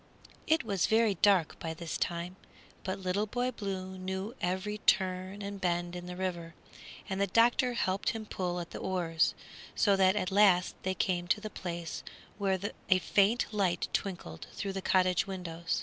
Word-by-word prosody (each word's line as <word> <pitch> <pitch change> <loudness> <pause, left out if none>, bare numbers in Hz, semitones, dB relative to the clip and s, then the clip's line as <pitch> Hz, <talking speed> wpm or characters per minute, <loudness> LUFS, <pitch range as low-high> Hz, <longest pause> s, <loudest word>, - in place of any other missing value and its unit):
It 320 0 +3
was 200 -5 +1
very 220 -1 +4
dark 190 -3 +3
by 160 -1 -4
this 165 0 -5
time, 175 +1 -2 0.5
but 190 0 -2
Little 195 +2 -1
Boy 245 +4 -1
Blue 190 -4 -5
knew 190 +4 -3
every 190 +4 -1
turn 190 +1 +1
and 200 -1 -6
bend 175 0 0
in 175 0 -6
the 180 - -6
river, 175 -3 -4 0.5
and 195 -1 -2
the 200 - +3
doctor 240 +4 +4
helped 190 -4 0
him 220 -1 -4
pull 180 -3 -2
at 170 - -6
the - - -6
oars, 165 -3 +1 0.4
so 200 -2 +4
that 190 0 +4
at 185 -2 -1
last 190 -3 +5
they 190 0 -1
came 175 -2 0
to 190 - +2
the 215 0 -6
place 170 -3 -5 0.4
where 195 -1 +2 0.3
a 185 - +6
faint 205 +5 +3
light 185 -4 +1
twinkled 170 - -3
through 195 -1 -3
the 195 - -3
cottage 185 +1 +3
window. 175 -3 -6
190 Hz, 175 wpm, -31 LUFS, 180-200 Hz, 0.5 s, a